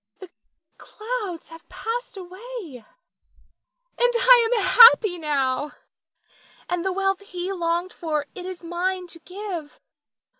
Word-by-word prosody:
Nina. 370 -2 -12
The - - -51
clouds 425 -7 -6
have 325 0 -14
passed 460 -1 -5
away 370 - -9 1.2
and 485 0 +3
I 480 -1 +6
am 450 -5 +1
happy 425 -3 +7
now; 285 -2 -1 0.9
and 355 -1 -2
the 380 - -1
wealth 390 0 0
he 365 -2 -6
longed 345 0 -2
for 305 -3 -3
it 365 -1 -8
is 370 -2 -8
mine 360 +2 -3
to 335 -1 -13
give. 360 -4 -8
370 Hz, 125 wpm, -23 LUFS, 335-425 Hz, 1.2 s, happy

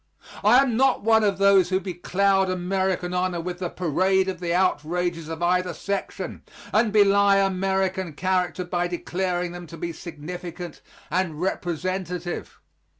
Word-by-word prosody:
I 215 +4 +6
am 245 -4 -1
not 265 -3 +3
one 220 0 +4
of 200 -2 +1
those 195 -2 +5
who 185 0 +2
becloud 190 +1 +1
American 185 0 -1
honor 180 -1 0
with 175 +1 -5
the 180 -2 -2
parade 185 +3 +1
of 185 -2 -3
the 175 -1 -2
outrages 175 -1 0
of 165 +1 -4
either 180 0 +1
section, 200 0 -4 0.3
and 215 0 +3
belie 200 -1 +5
American 190 -2 0
character 180 +1 -1
by 175 0 -1
declaring 175 0 -2
them 175 -1 -8
to 165 - -10
be 170 +1 -4
significant 175 +1 -8 0.3
and 170 -3 -1
representative. 180 0 -3
180 Hz, 145 wpm, -24 LUFS, 175-190 Hz, 0.3 s, I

